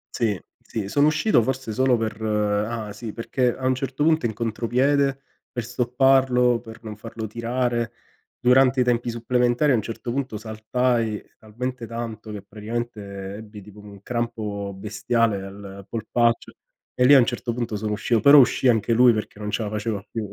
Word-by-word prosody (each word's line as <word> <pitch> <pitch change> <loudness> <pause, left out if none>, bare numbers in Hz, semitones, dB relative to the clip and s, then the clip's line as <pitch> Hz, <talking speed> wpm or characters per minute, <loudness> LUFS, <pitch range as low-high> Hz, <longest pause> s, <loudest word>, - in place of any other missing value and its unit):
Sì, 105 -6 0 0.2
sì, 105 -3 -5
sono 145 +7 +3
uscito 150 - +3
forse 130 -2 -3
solo 130 +2 +3
per 110 -2 -3
ah 105 +1 -1
sì, 110 -3 -7
perché 120 +1 0
a 130 - -6
un 130 - +2
certo 135 +2 -2
punto 160 -3 +3
in 110 - -1
contropiede 130 +5 +1 0.3
per 120 - -3
stopparlo 125 0 +3
per 110 -1 -12
non 110 -1 -7
farlo 110 +1 -7
tirare, 120 +1 -1 0.5
durante 130 +1 +4
i - - +5
tempi 120 -1 0
supplementari, 125 +4 +1
a - - +5
un 110 - +1
certo 115 +2 -5
punto 130 -4 -3
saltai 110 +1 -1 0.2
talmente 125 +3 -5
tanto 115 -2 -6
che 105 - -6
praticamente 105 -2 -6
ebbi 105 -1 -10
tipo 105 +1 -14
un 100 -1 -13
crampo 110 -4 -3
bestiale 110 +1 0
al 100 0 -10
polpaccio, 115 +1 0 0.5
e 125 - +5
lì 145 - +8
a 140 - +9
un 120 - +4
certo 120 0 -3
punto 115 -2 -3
sono 105 +1 -3
uscito, 115 +2 +1
però 140 +4 +8
uscì 130 0 +4
anche 115 0 +2
lui, 125 +1 +6
perché 105 -1 -5
non 105 0 -4
ce 115 - -1
la 105 - -3
faceva 105 -1 -3
più. 110 -3 -4
115 Hz, 175 wpm, -23 LUFS, 105-125 Hz, 0.5 s, a